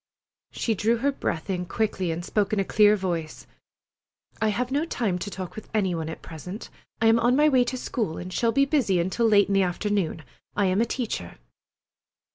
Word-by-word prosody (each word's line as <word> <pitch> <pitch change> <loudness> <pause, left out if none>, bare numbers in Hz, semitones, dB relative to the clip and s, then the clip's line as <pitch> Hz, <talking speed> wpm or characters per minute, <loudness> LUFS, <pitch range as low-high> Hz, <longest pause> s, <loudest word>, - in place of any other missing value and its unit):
She 230 - -1
drew 220 +3 +1
her 280 +5 +1
breath 160 - -3
in 180 -2 -2
quickly, 195 -3 -1
and 165 +1 -3
spoke 205 -2 0
in 210 - +2
a - - +3
clear 210 +1 +5
voice: 170 -5 -4 1.0
"I 220 - +3
have 240 +4 -1
no 285 +3 +1
time 220 - -1
to 190 - -4
talk 185 -3 -7
with 215 - -9
any 190 -4 +2
one 160 -1 -3
at 160 - -8
present. 180 - -8 0.3
I 225 - +1
am 225 +1 +5
on 240 +2 +3
my 300 +2 +5
way 260 -4 +4
to 255 +1 -3
school, 220 -9 -3
and 180 +1 -6
shall 230 +3 +2
be 275 +3 +3
busy 255 - +2
until 190 +7 +1
late 205 -2 +5
in 200 - -1
the 195 - +4
afternoon. 185 -3 -1 0.3
I 205 - +2
am 190 +3 +2
a - - +3
teacher." 215 - -4
205 Hz, 210 wpm, -25 LUFS, 180-235 Hz, 1.0 s, clear